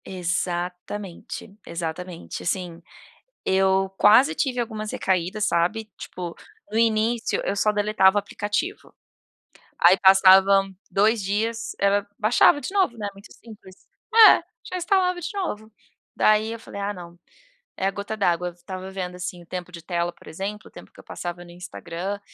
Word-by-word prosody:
Exatamente, 180 Hz, +2 st, -4 dB
exatamente, 170 Hz, +1 st, -6 dB
assim, 175 Hz, -2 st, -3 dB, 0.6 s
eu 190 Hz, 0 st, +2 dB
quase 235 Hz, +11 st, +6 dB
tive 265 Hz, -5 st, -1 dB
algumas 220 Hz, -2 st, -4 dB
recaídas, 190 Hz, +3 st, -1 dB
sabe, 180 Hz, +6 st, 0 dB
tipo 175 Hz, -2 st, -7 dB, 0.4 s
no 220 Hz, -, 0 dB
início 225 Hz, +1 st, +1 dB
eu 200 Hz, -, -1 dB
só 210 Hz, +2 st, +2 dB
deletava 205 Hz, -1 st, +3 dB
aplicativo, 210 Hz, -, -3 dB, 0.9 s
aí 175 Hz, +2 st, +7 dB
passavam 195 Hz, 0 st, +6 dB
2 215 Hz, +3 st, +2 dB
dias, 225 Hz, +4 st, -2 dB
ela 200 Hz, 0 st, +2 dB
baixava 225 Hz, +6 st, +4 dB
de 375 Hz, -, -6 dB
novo, 375 Hz, -12 st, +1 dB
né, 210 Hz, -2 st, -4 dB
muito 200 Hz, +2 st, -16 dB
simples. 210 Hz, -5 st, -16 dB, 0.3 s
É, 450 Hz, -1 st, +9 dB, 0.3 s
já -, -, -7 dB
instalava 360 Hz, 0 st, +1 dB
de 345 Hz, -, -4 dB
novo, 220 Hz, -, -4 dB, 0.4 s
daí 215 Hz, +1 st, +3 dB
eu 230 Hz, -, -8 dB
falei, 200 Hz, -, -8 dB
ah 200 Hz, +1 st, -1 dB
não, 175 Hz, -3 st, -11 dB, 0.6 s
é -, -, -2 dB
a -, -, +1 dB
gota 205 Hz, +2 st, -5 dB
d'água, 180 Hz, -3 st, +1 dB
f 175 Hz, 0 st, -19 dB
tava 185 Hz, -1 st, -6 dB
vendo, 185 Hz, -2 st, -5 dB
assim, 180 Hz, -1 st, -6 dB
o -, -, -23 dB
tempo 180 Hz, 0 st, -6 dB
de 170 Hz, -1 st, -9 dB
tela 170 Hz, 0 st, -1 dB
por -, -, -19 dB
exemplo, 200 Hz, +5 st, -6 dB
o -, -, -30 dB
tempo -, -, -13 dB
que -, -, -18 dB
eu -, -, -13 dB
passava 175 Hz, 0 st, -6 dB
no 175 Hz, -, -14 dB
Instagram, 180 Hz, +2 st, -6 dB
195 Hz, 155 wpm, -24 LUFS, 180-220 Hz, 0.9 s, É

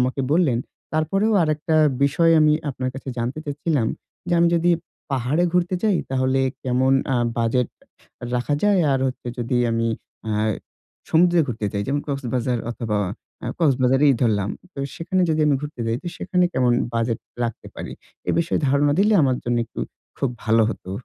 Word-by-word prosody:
আমাকে 130 Hz, +2 st, 0 dB
বললেন। 155 Hz, -8 st, +3 dB, 0.3 s
তারপরেও 195 Hz, +8 st, +1 dB
আরেকটা 155 Hz, +1 st, 0 dB, 0.3 s
বিষয় 165 Hz, +4 st, +4 dB
আমি 150 Hz, 0 st, +5 dB, 0.2 s
আপনার 130 Hz, -1 st, -3 dB
কাছে 135 Hz, 0 st, -8 dB
জানতে 120 Hz, +5 st, -2 dB
চাচ্ছিলাম। 145 Hz, -4 st, -1 dB, 0.4 s
যে 175 Hz, -, +2 dB
আমি 170 Hz, -, +5 dB
যদি 170 Hz, +1 st, +3 dB, 0.4 s
পাহাড়ে 135 Hz, +7 st, +1 dB
ঘুরতে 180 Hz, +1 st, +1 dB
যাই, 210 Hz, -4 st, +3 dB
তাহলে 130 Hz, 0 st, +1 dB, 0.2 s
কেমন 130 Hz, +1 st, +2 dB, 0.2 s
আ -, -, +2 dB, 0.2 s
বাজেট 115 Hz, +2 st, +1 dB, 0.7 s
রাখা 125 Hz, +4 st, 0 dB
যায় 205 Hz, -3 st, +4 dB
আর 135 Hz, -, +1 dB
হচ্ছে 130 Hz, -, -5 dB
যদি 120 Hz, +1 st, -1 dB
আমি 115 Hz, 0 st, 0 dB, 0.4 s
আ -, -, 0 dB, 0.8 s
সমুদ্রে 175 Hz, +1 st, +5 dB
ঘুরতে 110 Hz, -4 st, -3 dB
যাই, 100 Hz, -, -1 dB
যেমন 145 Hz, +2 st, 0 dB
কক্সবাজার 125 Hz, -3 st, -1 dB
অথবা 110 Hz, -3 st, -2 dB, 0.5 s
আ -, -, -3 dB
কক্সবাজারই 135 Hz, -2 st, +4 dB
ধরলাম। 105 Hz, -4 st, +1 dB, 0.2 s
তো -, -, -10 dB, 0.2 s
সেখানে 180 Hz, +2 st, 0 dB
যদি 155 Hz, 0 st, +1 dB
আমি 145 Hz, -, +4 dB
ঘুরতে 150 Hz, -4 st, -7 dB
যাই, 115 Hz, 0 st, 0 dB
তো -, -, -10 dB
সেখানে 180 Hz, -1 st, +1 dB
কেমন 125 Hz, -2 st, +2 dB, 0.2 s
বাজেট 115 Hz, 0 st, 0 dB, 0.3 s
রাখতে 115 Hz, -2 st, -5 dB
পারি? -, -, -6 dB, 0.4 s
এ -, -, +4 dB
বিষয়ে 170 Hz, -, +1 dB
ধারণা 145 Hz, +1 st, +3 dB
দিলে 210 Hz, +2 st, +4 dB
আমার 130 Hz, -2 st, +2 dB
জন্য 120 Hz, 0 st, 0 dB
একটু -, -, -7 dB, 0.4 s
খুব 135 Hz, -, +1 dB, 0.2 s
ভালো 110 Hz, +1 st, +4 dB
হতো। 95 Hz, -, -8 dB
135 Hz, 165 wpm, -22 LUFS, 120-160 Hz, 0.8 s, আমি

